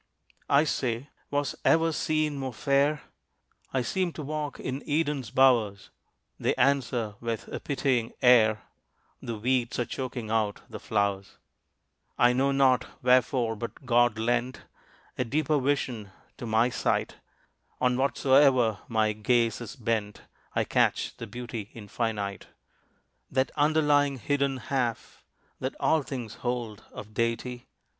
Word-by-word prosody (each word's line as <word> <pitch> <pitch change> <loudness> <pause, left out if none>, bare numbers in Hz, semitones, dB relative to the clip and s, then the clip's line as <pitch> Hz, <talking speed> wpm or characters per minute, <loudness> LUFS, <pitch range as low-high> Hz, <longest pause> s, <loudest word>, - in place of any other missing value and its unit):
I 140 +1 +5
say, 130 -3 -2 0.2
"Was 145 -1 -1
ever 165 0 +4
scene 155 -1 0
more 135 -3 -4
fair? 140 +3 +1 0.7
I 130 -2 0
seem 180 +8 -1
to 155 - -6
walk 150 0 -4
in 130 +2 -4
Eden's 145 -5 0
bowers." 120 -6 +3 0.5
They - - +1
answer 125 -6 +1
with 115 -2 -4
a - - -4
pitying 130 -5 -1
air, 110 -4 +5 0.6
"The 115 -2 -5
weeds 120 +1 0
are 120 - 0
choking 120 -4 -5
out 110 -2 0
the - - -8
flowers." 100 -2 -1 0.8
I 120 0 +5
know 135 +2 +2
not 130 -2 +3 0.2
wherefore, 125 -2 +3
but 115 +5 -7
God 120 -2 +3
lent 120 +3 -1 0.6
A - - +3
deeper 150 +4 +1
vision 130 -6 -1 0.3
to 120 - -6
my 110 +3 +2
sight. - - -1 0.6
On 125 -1 +2
whatsoe'er 130 -4 +3
my 110 -2 +1
gaze 115 +1 +1
is 120 - -7
bent 110 -4 -2 0.3
I - - +2
catch - - +1
the 115 - -7
beauty 115 -1 -6
Infinite; 105 -2 -3 0.8
That 130 0 0
underlying, 145 -2 +3
hidden 140 +2 0
half 125 -3 -3 0.4
That - - -3
all 160 - +3
things 125 -5 -6
hold 120 -4 -3
of 105 +1 -10
Deity. 115 +2 -2
125 Hz, 130 wpm, -27 LUFS, 115-140 Hz, 0.8 s, I